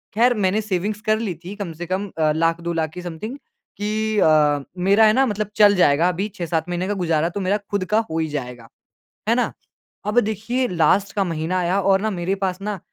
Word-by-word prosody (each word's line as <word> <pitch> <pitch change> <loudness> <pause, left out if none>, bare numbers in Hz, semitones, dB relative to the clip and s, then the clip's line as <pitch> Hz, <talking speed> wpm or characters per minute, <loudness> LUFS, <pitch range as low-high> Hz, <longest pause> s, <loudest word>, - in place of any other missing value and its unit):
ख़ैर 245 +2 +4
मैंने 190 +4 +2
सेविंग्स 210 +1 -2
कर 215 0 +3
लीं 205 -6 -3
थीं 195 +4 -7
कम 195 -5 -5
से 175 - -4
कम 190 +3 -2
अ, 155 -1 +2
100000-200000 165 0 0
की 180 - -7
समथिंग। 180 - -6 0.4
कि 215 +1 -1
अ, 150 -3 +4 0.2
मेरा 205 +3 +5
है 215 - +5
ना 270 +4 +4
मतलब 210 -3 -2
चल 205 -1 +6
जाएगा 165 -2 +4
अभी 190 +4 -2
6-7 165 -1 -2
महीने 180 +1 -2
का 205 - 0
गुज़ारा 165 -1 +1
तो 190 - -5
मेरा 190 +2 +1
खुद 200 -2 0
का - - +5
हो 160 - -3
ही 160 - 0
जाएगा। 125 -5 -6 0.6
है - - +4
ना? - - 0 0.5
अब 210 +3 +1
देखिए 225 +4 -1
लास्ट 185 +3 +2
का 195 - +2
महीना 165 +1 -2
आया 180 +3 +1
और 195 0 +3
ना 220 +1 -1
मेरे 185 0 -1
पास 185 0 -2
ना 210 -1 -3
185 Hz, 215 wpm, -21 LUFS, 165-210 Hz, 0.6 s, चल